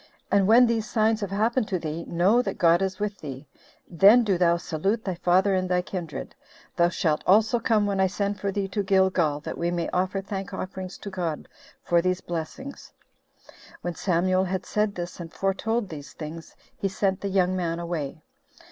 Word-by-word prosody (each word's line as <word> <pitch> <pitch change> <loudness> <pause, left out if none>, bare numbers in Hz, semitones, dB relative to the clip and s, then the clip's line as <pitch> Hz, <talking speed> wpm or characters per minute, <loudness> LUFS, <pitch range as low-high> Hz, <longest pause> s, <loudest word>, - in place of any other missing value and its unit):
And 200 -1 +4
when 235 +3 +7
these 230 -1 -1
signs 220 -1 +2
have 200 - -2
happened 220 +4 +1
to 185 - -1
thee, 165 0 -5
know 190 +8 +3
that 195 -5 -4
God 170 +1 +4
is 190 -1 -1
with 210 -1 -3
thee; 135 -1 -8 0.4
then 200 +8 +6
do 200 -4 +1
thou 170 -1 +3
salute 195 +7 -2
thy 190 - -1
father 185 +3 +2
and 185 -1 0
thy 180 0 +1
kindred. 175 -5 -6 0.4
Thou 170 0 +4
shalt 160 -4 0
also 220 +5 +4
come 220 -2 +2
when 200 -1 -1
I 190 - +4
send 200 +1 -2
for 200 +1 -1
thee 195 0 -2
to 205 +2 -1
Gilgal, 190 -6 +2
that - - -6
we 170 - 0
may 175 -1 -2
offer 185 +2 0
thank 195 0 -5
offerings 185 0 -6
to 200 - -8
God 170 -5 -3 0.4
for 170 -1 +3
these 185 +1 0
blessings." 175 - -6 0.9
When 175 - -3
Samuel 185 +2 +1
had 185 0 -3
said 210 -1 0
this, 175 0 -6
and 165 -1 -7
foretold 205 +3 -1
these 145 -4 -9
things, 160 +1 -8 0.2
he 195 - -2
sent 195 -1 -1
the 200 - -2
young 185 -1 +2
man 170 -2 -1
away. 160 -4 -4
190 Hz, 190 wpm, -25 LUFS, 170-200 Hz, 0.9 s, when